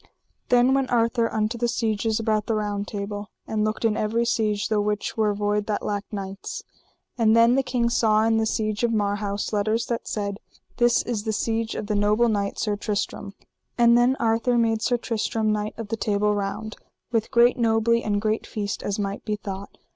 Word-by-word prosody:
Then 245 +1 +5
went 270 -1 +1
Arthur 230 0 +2
unto 220 +2 -1
the 240 - +1
sieges 220 -1 0
about 215 -2 0
the 225 - +1
Round 205 -1 -2
Table, 205 0 -5 0.2
and 215 -1 -1
looked 215 +1 -1
in 220 -2 +2
every 225 +3 0
siege 210 -3 0
the 215 -2 +1
which 210 0 -2
were 215 -2 +2
void 205 0 0
that 210 -1 -2
lacked 205 0 -3
knights. 195 -1 -6 0.6
And 220 -1 +4
then 230 +1 +6
the 270 - +3
king 250 -2 0
saw 220 -2 +3
in 225 0 +3
the 220 0 +1
siege 215 0 -1
of 235 - +3
Marhaus 205 -1 -1
letters 215 +2 +1
that 235 -1 -3
said: 200 -1 -3 0.4
This 240 -1 +3
is 225 -4 -3
the 220 - -1
siege 225 +1 -1
of - - -4
the 210 - -2
noble 210 +3 +3
knight, 200 -2 -1
Sir 210 -2 0
Tristram. 205 -1 -3 0.4
And 235 -1 +6
then 245 +2 +4
Arthur 230 +2 +2
made 225 -1 +2
Sir 245 +1 +1
Tristram 225 -2 -1
Knight 210 0 -2
of 225 -2 -6
the 225 - -1
Table 210 -1 +1
Round, 205 +2 -4 0.3
with 225 -3 0
great 240 +1 +4
nobley 230 0 +2
and 205 -1 0
great 215 +1 -1
feast 205 -2 -4
as 200 - -2
might 200 -1 -3
be 210 - -1
thought. 200 -1 -7
215 Hz, 200 wpm, -24 LUFS, 205-230 Hz, 0.6 s, then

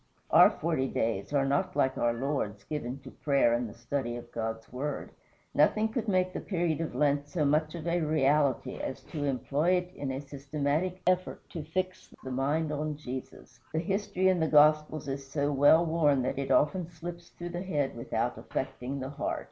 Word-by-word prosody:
Our - - +9
"forty 155 -5 -1
days" 110 -4 -1
are 140 -2 +2
not 140 0 0
like 135 -2 +2
our 120 - +2
Lord's, 115 -6 -2
given 135 -4 -4
to - - -10
prayer 140 -5 +2
and 120 -1 0
the - - -12
study 120 0 -3
of 120 0 -9
God's 115 0 -4
Word. 140 +3 -4 0.4
Nothing 215 +9 +3
could 230 0 -3
make 185 -2 +2
the - - -3
period 170 -4 -1
of 165 - -4
Lent 145 -1 +2
so 150 0 0
much 155 +3 +2
of 165 -2 -6
a 175 0 +1
reality 150 -3 +2
as 135 - -5
to 145 -3 -4
employ 145 +5 +1
it 180 0 0
in 140 -6 -4
a 130 - -3
systematic 145 +6 -2
effort 185 0 0
to 165 - -4
fix 185 +4 -3
the 130 - -5
mind 145 +5 0
on 150 0 -2
Jesus. 130 -3 -8
The - - 0
history 195 +1 0
in 185 -2 +3
the 160 - +2
Gospels 150 0 +4
is 135 0 -3
so 145 0 0
well 145 +4 +6
worn 150 -5 +3
that 130 - -1
it 135 - -3
often 165 +3 +2
slips 170 +1 -8
through 175 0 -7
the 175 0 -4
head 150 -9 -1
without 120 - -2
affecting 135 +3 -4
the 130 - -4
heart. 140 - -2
145 Hz, 195 wpm, -30 LUFS, 135-170 Hz, 0.4 s, Our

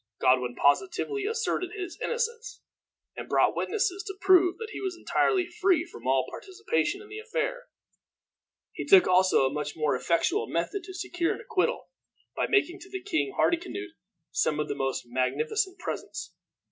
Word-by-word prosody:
Godwin 125 -1 +3
positively 390 - +1
asserted 450 -5 -1
his 365 -2 -6
innocence, 475 0 -3 0.5
and - - -7
brought - - +3
witnesses 400 -3 0
to 390 -1 -6
prove 365 -2 +5
that 450 -2 -7
he - - -6
was 380 -2 -3
entirely 370 +1 +2
free 355 -2 +1
from 345 - -10
all 130 0 +3
participation 405 +1 -2
in - - -14
the 425 +1 -7
affair. - - -3 1.1
He - - -4
took 385 -2 +7
also 185 -6 +4
a 130 - 0
much 150 0 -3
more 155 -3 +1
effectual 345 - +1
method 400 -2 -2
to 375 0 -9
secure 350 -2 -1
an - - -11
acquittal, 455 +2 -1 0.5
by - - 0
making 380 -3 +2
to 380 +2 -7
King 390 +1 -1
Hardicanute 355 +3 0 0.4
some 155 - +1 0.2
most 135 -1 -2
magnificent 135 - -1
presents. 365 - -6
370 Hz, 150 wpm, -28 LUFS, -, 1.1 s, took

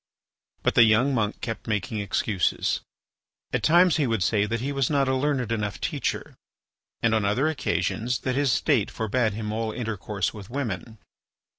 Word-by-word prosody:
But - - +2
the - - +6
young 115 +5 +4
monk 110 -4 -1
kept 115 -1 -5
making 110 +1 -2
excuses. 100 -1 0 0.7
At - - +1
times 170 +7 +5
he 145 -4 +1
would 115 -5 0
say 105 +1 +2
that 115 +2 -1
he 135 +5 -2
was 135 -3 0
not 140 -2 +2
a 130 - +2
learned 130 -4 0
enough 105 -3 -2
teacher, - - -3 0.7
and 115 -1 +3
on 110 -2 +2
other 105 +9 +2
occasions 120 - -1
that 130 - -1
his 140 0 +2
state - - +2
forbade 110 0 0
him 105 0 -4
all 110 0 -2
intercourse 105 -4 -3
with 105 -2 -10
women. 115 -4 -4
115 Hz, 170 wpm, -25 LUFS, 105-130 Hz, 0.7 s, the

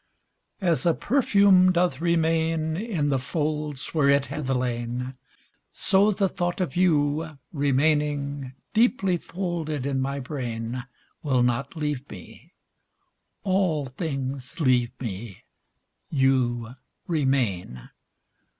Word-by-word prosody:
AS 165 -8 +2
a 170 - +4
perfume 200 -8 +4
doth 175 -5 +1
remain 165 -1 +1
In 180 -7 -1
the 135 -2 +1
folds 150 +1 -2
where 150 -4 +3
it 140 0 +4
hath 150 -3 -5
lain, 125 0 -2 0.6
So 195 +2 +3
the 195 -1 +2
thought 175 0 -2
of 180 -7 -2
you, 155 -3 +1 0.2
remaining 145 -1 +1 0.2
Deeply 215 -5 +3
folded 170 -6 -3
in 135 -1 0
my 140 +1 -2
brain. 125 -3 -4 0.4
Will 130 -6 +2
not 125 +4 -1
leave 150 -3 -3
me: 90 - -12 0.9
all 185 -7 +1
things 135 -2 -4
leave 125 -5 +3
me: 105 -4 -6 0.7
You 125 -4 +1 0.3
remain. 125 - -1
145 Hz, 105 wpm, -25 LUFS, 130-170 Hz, 0.9 s, a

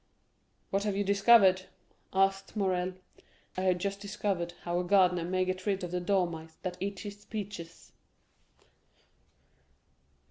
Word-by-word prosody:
"What 195 +1 +1
have 205 -2 0
you 205 - +2
discovered?" 195 -2 +5 0.4
asked 195 +1 +1
Morrel. 185 -3 0 0.6
"I 185 - -2
have 185 -1 +2
just 200 +2 -3
discovered 195 -4 -2
how 175 0 -1
a - - 0
gardener 180 -2 +4
may 185 +1 +1
get 185 +1 -3
rid 195 -2 0
of 175 - -4
the 180 - -1
dormice 170 -4 -1
that 180 -1 -3
eat 200 0 -3
his 205 -1 -8
peaches." 200 -6 -7
190 Hz, 135 wpm, -30 LUFS, 180-200 Hz, 0.6 s, discovered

